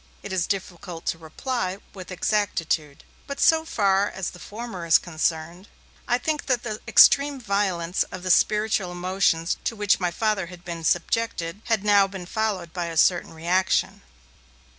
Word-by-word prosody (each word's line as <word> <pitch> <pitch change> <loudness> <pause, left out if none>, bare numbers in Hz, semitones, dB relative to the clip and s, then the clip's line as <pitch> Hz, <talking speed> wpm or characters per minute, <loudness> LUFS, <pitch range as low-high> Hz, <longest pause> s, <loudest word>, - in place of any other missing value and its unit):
It 200 - -6
is 180 -2 0
difficult 180 -3 -5
to 165 - -2
reply 185 - -3 0.2
with 185 -2 -10
exactitude. 175 -6 -1 0.2
But 280 -1 -6
so 320 0 +4
far 200 -9 +1
as 190 -1 -4
the 180 - -13
former 210 -4 -7
is 165 -1 +6
concerned, 170 +2 -3 0.4
I 245 - +2
thinly 305 +4 -1
that 250 -3 +1
the 215 -3 -4
extreme 280 +5 +6
violence 195 -5 -1
of 185 -1 -7
the 185 - +1
spiritual 210 -2 +2
emotions 180 -2 0
to 230 - -2
which 205 -2 +2
my 180 -2 0
Father 200 0 -1
had 180 0 -13
been 170 -1 -6
subjected, 175 +1 -1
had 225 -4 0
now 200 -1 +5
been 190 -2 -8
followed 195 -4 -2
by 175 -2 -3
a 165 -1 -5
certain 175 +2 +3
reaction. 175 +4 0
190 Hz, 160 wpm, -24 LUFS, 170-215 Hz, 0.4 s, is